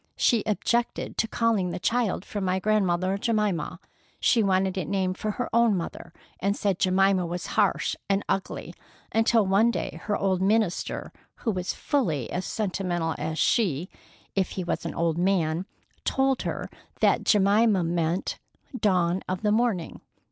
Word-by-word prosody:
"She 235 Hz, -3 st, +3 dB
objected 235 Hz, +3 st, 0 dB
to 225 Hz, -, +2 dB
calling 220 Hz, -5 st, +1 dB
the -, -, -4 dB
child 225 Hz, 0 st, 0 dB
for 205 Hz, -, -4 dB
my 185 Hz, 0 st, +1 dB
grandmother, 190 Hz, -2 st, +1 dB
Jemima. 210 Hz, -8 st, 0 dB, 0.4 s
She 235 Hz, -, +3 dB
wanted 190 Hz, -2 st, +2 dB
it 185 Hz, -5 st, -3 dB
named 190 Hz, -2 st, -1 dB
for 215 Hz, -, -2 dB
her 245 Hz, -, -3 dB
own 230 Hz, -3 st, +4 dB
mother, 170 Hz, 0 st, -6 dB, 0.3 s
and 200 Hz, +2 st, 0 dB
said 195 Hz, -3 st, 0 dB
Jemima 190 Hz, 0 st, +3 dB
was 175 Hz, +1 st, -4 dB
harsh 205 Hz, -3 st, +2 dB
and 195 Hz, 0 st, +1 dB
ugly, 195 Hz, -, -3 dB, 0.4 s
until 225 Hz, -1 st, +3 dB
one 200 Hz, +5 st, +4 dB
day 235 Hz, -, -3 dB
her 210 Hz, -1 st, 0 dB
old 190 Hz, -2 st, 0 dB
minister, 205 Hz, -1 st, 0 dB, 0.2 s
who 225 Hz, -, -2 dB
was 185 Hz, -2 st, -3 dB
fully 165 Hz, -, -1 dB
as 180 Hz, 0 st, -2 dB
sentimental 180 Hz, -5 st, -1 dB
as 155 Hz, +1 st, -3 dB
she, 180 Hz, -, +1 dB, 0.4 s
if 190 Hz, -2 st, +1 dB
he 185 Hz, -, -3 dB
was 170 Hz, -, -2 dB
an -, -, -6 dB
old 165 Hz, 0 st, 0 dB
man, 180 Hz, -1 st, +1 dB, 0.4 s
told 270 Hz, -1 st, +1 dB
her -, -, -3 dB, 0.3 s
that -, -, +3 dB
Jemima 205 Hz, -1 st, +4 dB
meant 170 Hz, +1 st, -1 dB, 0.4 s
'Dawn 185 Hz, -6 st, +1 dB
of 185 Hz, +2 st, -3 dB
the 210 Hz, -, +3 dB
Morning. 215 Hz, -6 st, 0 dB
195 Hz, 155 wpm, -26 LUFS, 180-215 Hz, 0.4 s, own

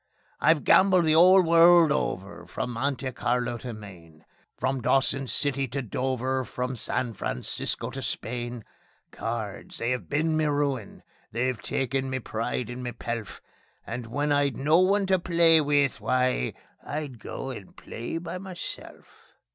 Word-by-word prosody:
I've 160 Hz, -2 st, +3 dB
gambled 185 Hz, -3 st, +5 dB
the 155 Hz, -, +4 dB
'ole 185 Hz, +3 st, +7 dB
world 170 Hz, -1 st, +6 dB
over, 90 Hz, -, -3 dB
from 120 Hz, -, -4 dB
Monte 130 Hz, +2 st, -2 dB
Carlo 120 Hz, -1 st, -1 dB
to 125 Hz, +1 st, -6 dB
Maine; 90 Hz, -8 st, -12 dB, 0.3 s
From 130 Hz, 0 st, -1 dB
Dawson 135 Hz, +2 st, +1 dB
City 140 Hz, 0 st, -1 dB
to 135 Hz, +3 st, -3 dB
Dover, 130 Hz, +2 st, -1 dB
from 125 Hz, +2 st, -4 dB
San 120 Hz, +1 st, -2 dB
Francisco 65 Hz, -, -3 dB
to -, -, -6 dB
Spain. 120 Hz, 0 st, -4 dB, 0.5 s
Cards! 110 Hz, -3 st, -5 dB
They 115 Hz, +2 st, 0 dB
'ave 125 Hz, -, -4 dB
been 155 Hz, +2 st, 0 dB
me 155 Hz, 0 st, +2 dB
ruin. 145 Hz, -7 st, -1 dB, 0.3 s
They've 125 Hz, +2 st, -1 dB
taken 135 Hz, +1 st, -1 dB
me 130 Hz, -, -1 dB
pride 115 Hz, 0 st, -3 dB
and 125 Hz, +1 st, -6 dB
me 120 Hz, -1 st, -4 dB
pelf, 115 Hz, -2 st, -5 dB, 0.4 s
And 120 Hz, -2 st, -5 dB
when 145 Hz, +5 st, -1 dB
I'd 145 Hz, -4 st, +2 dB
no 155 Hz, +5 st, +4 dB
one 195 Hz, +2 st, +3 dB
to 190 Hz, -1 st, +2 dB
play 170 Hz, -2 st, +5 dB
with 145 Hz, -2 st, +1 dB
why, 125 Hz, -, +1 dB, 0.3 s
I'd 145 Hz, -5 st, -5 dB
go 135 Hz, +5 st, -6 dB
and 105 Hz, -7 st, -9 dB
I'd -, -, -25 dB
play 120 Hz, +7 st, -6 dB
by 170 Hz, +2 st, -5 dB
meself. 185 Hz, -2 st, -9 dB
130 Hz, 155 wpm, -27 LUFS, 120-150 Hz, 0.5 s, ole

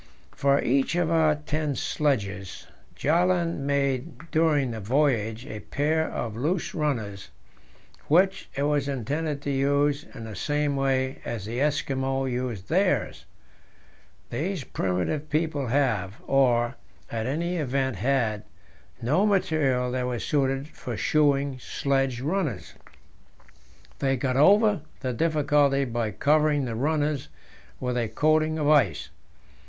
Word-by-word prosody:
For 140 Hz, 0 st, +2 dB
each 135 Hz, +5 st, +1 dB
of 175 Hz, -2 st, +1 dB
our 160 Hz, -2 st, +4 dB
ten 150 Hz, -1 st, -2 dB
sledges, 100 Hz, -13 st, -2 dB, 0.3 s
Bjaaland 170 Hz, +1 st, +1 dB
made 140 Hz, +2 st, -2 dB
during 150 Hz, -5 st, +2 dB
the 115 Hz, -, -5 dB
voyage 115 Hz, -1 st, 0 dB
a 110 Hz, -6 st, -7 dB
pair 155 Hz, +6 st, 0 dB
of 110 Hz, -3 st, -4 dB
loose 160 Hz, +9 st, -1 dB
runners, 110 Hz, -11 st, -2 dB, 0.8 s
which 190 Hz, +5 st, +3 dB
it 140 Hz, -, -1 dB
was 145 Hz, -1 st, +1 dB
intended 140 Hz, +3 st, -2 dB
to 145 Hz, -, -1 dB
use 140 Hz, +1 st, +1 dB
in 115 Hz, -, -7 dB
the 110 Hz, -2 st, -7 dB
same 145 Hz, +5 st, 0 dB
way 135 Hz, -1 st, 0 dB
as 110 Hz, -4 st, -5 dB
the 115 Hz, +3 st, -4 dB
Eskimo 135 Hz, -2 st, 0 dB
use 125 Hz, -6 st, -3 dB
theirs. 170 Hz, -, 0 dB, 1.1 s
These 180 Hz, 0 st, -2 dB
primitive 95 Hz, -, -2 dB
people 155 Hz, -3 st, 0 dB
have 115 Hz, -7 st, 0 dB
or, 125 Hz, -2 st, +2 dB, 0.3 s
at 115 Hz, 0 st, -2 dB
all 130 Hz, -, 0 dB
events, 135 Hz, -, -1 dB
had 115 Hz, -4 st, 0 dB, 0.6 s
no 155 Hz, -, +3 dB
material 145 Hz, -10 st, +1 dB
that 125 Hz, 0 st, -1 dB
was 120 Hz, -2 st, -3 dB
suited 135 Hz, -1 st, 0 dB
for -, -, -7 dB
shoeing 140 Hz, -3 st, +2 dB
sledge 135 Hz, -2 st, -1 dB
runners. 150 Hz, -, -2 dB, 1.3 s
They 135 Hz, -1 st, +1 dB
get 130 Hz, 0 st, -1 dB
over 205 Hz, +6 st, +5 dB, 0.2 s
the 130 Hz, -2 st, -2 dB
difficulty 145 Hz, -2 st, +2 dB
by 120 Hz, -3 st, -2 dB
covering 150 Hz, +4 st, +2 dB
the 120 Hz, -, -3 dB
runners 145 Hz, +3 st, -1 dB, 0.5 s
with 125 Hz, -1 st, -2 dB
a 120 Hz, -2 st, 0 dB
coating 155 Hz, +6 st, +2 dB
of 150 Hz, -2 st, 0 dB
ice. 150 Hz, -3 st, +3 dB
140 Hz, 125 wpm, -26 LUFS, 125-155 Hz, 1.3 s, over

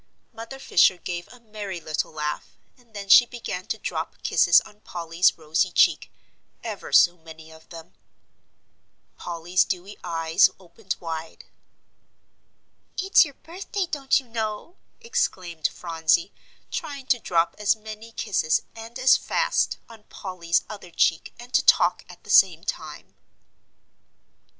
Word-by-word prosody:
Mother 230 Hz, +4 st, -9 dB
Fisher 185 Hz, -7 st, +3 dB
gave 175 Hz, -1 st, -6 dB
a 250 Hz, -, -16 dB
merry 210 Hz, -5 st, -7 dB
little 155 Hz, -2 st, -3 dB
laugh, 150 Hz, -1 st, -5 dB, 0.2 s
and 235 Hz, -3 st, -25 dB
then 200 Hz, -1 st, -6 dB
she 240 Hz, +5 st, +8 dB
began 205 Hz, -7 st, -6 dB
to -, -, -2 dB
drop 165 Hz, -5 st, -5 dB
kisses 170 Hz, -, +5 dB
on 210 Hz, 0 st, -17 dB
Polly's 170 Hz, -1 st, 0 dB
rosy 160 Hz, +3 st, 0 dB
cheek -, -, +3 dB, 0.5 s
ever 215 Hz, -4 st, -6 dB
so 175 Hz, -1 st, +5 dB
many 160 Hz, 0 st, -13 dB
of 160 Hz, 0 st, -17 dB
them. 165 Hz, 0 st, -12 dB, 1.2 s
Polly's 175 Hz, +2 st, 0 dB
dewy 190 Hz, +2 st, -5 dB
eyes 165 Hz, -2 st, +3 dB
opened 185 Hz, +2 st, -6 dB
wide. 165 Hz, -1 st, -7 dB, 1.5 s
"It's 385 Hz, +1 st, +5 dB
your 285 Hz, -3 st, -11 dB
birthday, 375 Hz, +3 st, -5 dB
don't 285 Hz, -5 st, +1 dB
you 265 Hz, -, -15 dB
know!" 225 Hz, -, -5 dB, 0.2 s
exclaimed 185 Hz, -, -1 dB
Phronsie, 165 Hz, -, 0 dB, 0.4 s
trying 285 Hz, -5 st, -5 dB
to 250 Hz, -2 st, +2 dB
drop 170 Hz, -5 st, +1 dB
as 210 Hz, +1 st, +3 dB
many 220 Hz, +1 st, -10 dB
kisses 185 Hz, -8 st, 0 dB
and 230 Hz, +2 st, -9 dB
as 260 Hz, 0 st, +5 dB
fast, -, -, 0 dB
on 220 Hz, -2 st, -16 dB
Polly's 175 Hz, -3 st, -2 dB
other 200 Hz, -4 st, -10 dB
cheek, 165 Hz, -1 st, 0 dB
and 245 Hz, +1 st, -13 dB
to -, -, +4 dB
talk -, -, +4 dB
at -, -, -14 dB
the -, -, -6 dB
same -, -, +5 dB
time. -, -, -6 dB
195 Hz, 135 wpm, -24 LUFS, 170-235 Hz, 1.5 s, she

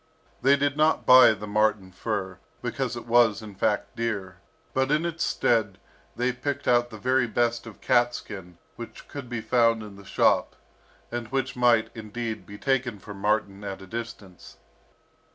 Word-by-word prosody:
They 135 Hz, +2 st, +5 dB
did 140 Hz, 0 st, 0 dB
not 155 Hz, +1 st, +2 dB
buy 130 Hz, -3 st, +8 dB
the 105 Hz, 0 st, -7 dB
marten 105 Hz, -2 st, +1 dB
fur, 95 Hz, -1 st, -4 dB, 0.2 s
because -, -, -2 dB
it -, -, -8 dB
was, 115 Hz, -2 st, +3 dB
in 105 Hz, -2 st, -9 dB
fact, 95 Hz, -, -1 dB
dear, 105 Hz, -6 st, -3 dB, 0.4 s
but 130 Hz, 0 st, +1 dB
in 155 Hz, +3 st, +2 dB
its 170 Hz, 0 st, -2 dB
stead, 105 Hz, -5 st, +1 dB, 0.4 s
they 125 Hz, +1 st, +1 dB
picked 140 Hz, +2 st, -4 dB
out 120 Hz, 0 st, +3 dB
the 110 Hz, -, -9 dB
very 130 Hz, +2 st, +1 dB
best 120 Hz, +1 st, 0 dB
of 110 Hz, -, -12 dB
cat 120 Hz, 0 st, +3 dB
skin 90 Hz, -4 st, -9 dB, 0.2 s
which 115 Hz, -, -10 dB
could 140 Hz, -4 st, -8 dB
be 120 Hz, -2 st, -3 dB
found 115 Hz, -1 st, +2 dB
in 100 Hz, -2 st, -11 dB
the 100 Hz, -, -13 dB
shop, -, -, +2 dB, 0.6 s
and 120 Hz, -1 st, -4 dB
which 135 Hz, +1 st, -2 dB
might, 120 Hz, -3 st, +3 dB
indeed, 110 Hz, 0 st, -6 dB
be 100 Hz, -, -9 dB
taken 130 Hz, -3 st, 0 dB
for 105 Hz, +1 st, -10 dB
marten 100 Hz, 0 st, -1 dB
at 95 Hz, -1 st, -5 dB
a 95 Hz, -, -11 dB
distance. 110 Hz, -3 st, -8 dB
115 Hz, 170 wpm, -26 LUFS, 105-125 Hz, 0.6 s, buy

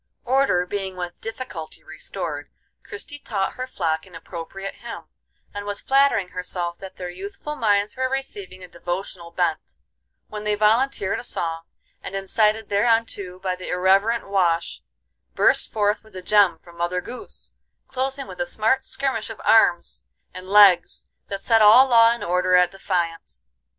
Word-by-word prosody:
Order 255 Hz, -8 st, +2 dB
being 190 Hz, 0 st, -4 dB
with 175 Hz, -1 st, -6 dB
difficulty 225 Hz, -9 st, -7 dB
restored, -, -, -6 dB, 0.3 s
Christie 415 Hz, -9 st, -8 dB
taught 200 Hz, -8 st, -2 dB
her 255 Hz, 0 st, -5 dB
flock 160 Hz, -7 st, -2 dB
an 180 Hz, -, -15 dB
appropriate 195 Hz, +3 st, -7 dB
hymn, 235 Hz, -, -8 dB, 0.5 s
and 205 Hz, -, -5 dB
was 205 Hz, 0 st, -4 dB
flattering 270 Hz, -9 st, +2 dB
herself 180 Hz, -1 st, -4 dB
that 190 Hz, -1 st, -10 dB
their 180 Hz, -1 st, -6 dB
youthful 200 Hz, +11 st, -7 dB
minds 205 Hz, -4 st, +1 dB
were 260 Hz, 0 st, -1 dB
receiving 200 Hz, -9 st, -5 dB
a -, -, -9 dB
devotional 175 Hz, 0 st, -6 dB
bent, 165 Hz, -, -2 dB, 0.5 s
when 210 Hz, 0 st, -7 dB
they 210 Hz, 0 st, +1 dB
volunteered 215 Hz, -1 st, +2 dB
a -, -, -8 dB
song, 165 Hz, -7 st, -3 dB, 0.4 s
and 195 Hz, -, -7 dB
incited 210 Hz, +3 st, +1 dB
thereunto 205 Hz, -3 st, +1 dB
by 185 Hz, -1 st, -2 dB
the 185 Hz, -, -9 dB
irreverent 195 Hz, +6 st, +2 dB
Wash, 170 Hz, -, 0 dB, 0.5 s
burst -, -, +3 dB
forth 210 Hz, 0 st, 0 dB
with 220 Hz, -3 st, -19 dB
a 185 Hz, -, -7 dB
gem 200 Hz, -4 st, +4 dB
from 170 Hz, 0 st, -17 dB
Mother 175 Hz, +1 st, -1 dB
Goose, 250 Hz, -, -9 dB, 0.3 s
closing 265 Hz, +1 st, -3 dB
with -, -, -7 dB
a 260 Hz, -, -1 dB
smart 260 Hz, +3 st, 0 dB
skirmish 265 Hz, -5 st, -2 dB
of 225 Hz, -, -8 dB
arms 175 Hz, -, +3 dB, 0.3 s
and 185 Hz, +1 st, -9 dB
legs 195 Hz, -4 st, +5 dB, 0.2 s
that 195 Hz, 0 st, -5 dB
set 225 Hz, -2 st, +4 dB
all 225 Hz, +6 st, +8 dB
law 230 Hz, -2 st, +6 dB
and 235 Hz, -, -3 dB
order 180 Hz, +1 st, +2 dB
at 180 Hz, 0 st, +4 dB
defiance. 175 Hz, -, -3 dB
200 Hz, 155 wpm, -23 LUFS, 180-230 Hz, 0.5 s, all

